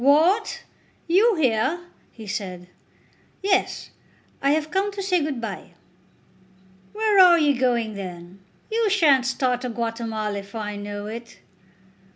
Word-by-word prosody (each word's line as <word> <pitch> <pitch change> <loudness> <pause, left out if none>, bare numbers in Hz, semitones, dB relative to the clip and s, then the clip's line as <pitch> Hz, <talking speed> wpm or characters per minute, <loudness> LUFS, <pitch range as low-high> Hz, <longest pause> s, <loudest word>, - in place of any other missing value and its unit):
"What; 325 +10 +3 0.4
you 405 +6 +4
here?" 265 +2 +1 0.3
he 225 - -11
said. 190 -3 -5 0.8
"Yes; 390 -1 0 0.5
I 275 - +2
have 310 +1 0
come 390 +2 0
to 395 -1 -4
say 365 -3 +2
good 290 -4 -2
bye." 230 - -7 1.2
"Where 425 -2 +2
are 360 -2 +8
you 295 -3 +3
going 235 -4 +1
then? 180 -1 -8 0.3
You 450 -1 +1
shan't 295 - +4
start 255 -2 0
to 250 - -3
Guatemala 225 -3 -3
if 200 +2 -12
I 210 -2 -4
know 205 0 -6
it." 230 +2 -8
255 Hz, 135 wpm, -23 LUFS, 215-350 Hz, 1.2 s, are